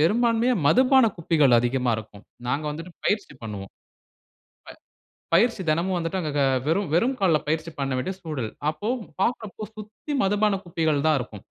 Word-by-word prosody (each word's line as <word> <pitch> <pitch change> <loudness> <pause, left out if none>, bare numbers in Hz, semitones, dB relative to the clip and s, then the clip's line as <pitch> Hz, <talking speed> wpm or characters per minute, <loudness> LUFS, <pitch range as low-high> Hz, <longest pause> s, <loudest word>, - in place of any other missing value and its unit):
பெரும்பான்மையா 230 +7 +3
மதுபான 260 - +5
குப்பைகள் 155 -6 +3
அதிகமா 125 0 0
இருக்கும். 105 -1 -10 0.2
நாங்க 140 +5 -1
வந்துட்டு 165 +4 -7
பயிற்சி 205 -5 0
பண்ணுவோம். 100 -3 -6 1.4
ப - - -6
பயிற்சி 225 0 +2
தினமும் 175 +4 +1
வந்துட்டு 170 +2 -2
அங்க 155 -4 -3
க - - +4 0.2
வெறும் 180 +5 +1
வெறும் 240 +10 +3
கால்ல 170 -6 +4
பயிற்சி 160 +2 -1
பண்ண 135 -1 -1
வேண்டிய 185 +9 -3
சூழல். 145 -10 -4 0.2
அப்போ, 205 +7 -5 0.3
பாக்குறப்போ 215 -1 -2
சுத்தி 215 +7 -8
மதுபானம் 200 0 +1
குப்பைகள் 160 -4 0
தான் 155 - +4
இருக்கும். 110 -5 -8
170 Hz, 150 wpm, -25 LUFS, 145-210 Hz, 1.4 s, மதுபான